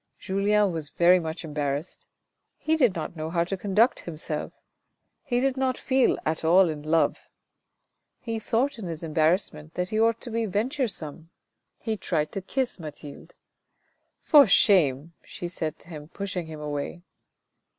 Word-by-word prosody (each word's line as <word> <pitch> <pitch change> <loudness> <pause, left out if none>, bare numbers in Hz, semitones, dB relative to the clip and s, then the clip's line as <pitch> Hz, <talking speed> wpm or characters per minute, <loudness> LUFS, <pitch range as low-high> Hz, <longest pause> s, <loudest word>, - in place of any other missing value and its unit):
Julien 200 +1 +1
was 160 -3 -4
very 175 +2 +4
much 160 0 -5
embarrassed. 145 +1 -4 0.5
He 315 - +1
did 250 -11 +3
not 160 +1 -5
know 155 0 -4
how 170 0 +1
to 180 +3 -3
conduct 205 +5 +2
himself. 155 -2 -3 0.7
He 245 -6 -1
did 265 +1 0
not 260 -1 0
feel 260 -1 +2
at 155 +1 -1
all 175 +2 +5
in 150 -2 -5
love. 160 +2 0 0.9
He 230 -2 -4
thought 235 +4 0
in 205 - -6
his 165 -1 -5
embarrassment 155 0 0
that 180 0 -2
he 215 - -1
ought 230 0 +3
to 240 - -6
be 225 0 -1
venture 245 +7 0
some. 160 -4 -6 0.5
He 220 -2 -3
tried 155 -5 -1
to 195 - -4
kiss 250 +3 -2
Mathilde. 150 -2 -10 0.5
" - - -46
For 290 -5 +9
shame," 165 - +4
she 175 - -7
said 160 -3 -4
to - - -18
him, 150 -3 -9
pushing 185 -1 -5
him 155 -1 -8
away. 150 +4 -4
180 Hz, 160 wpm, -26 LUFS, 155-220 Hz, 0.9 s, For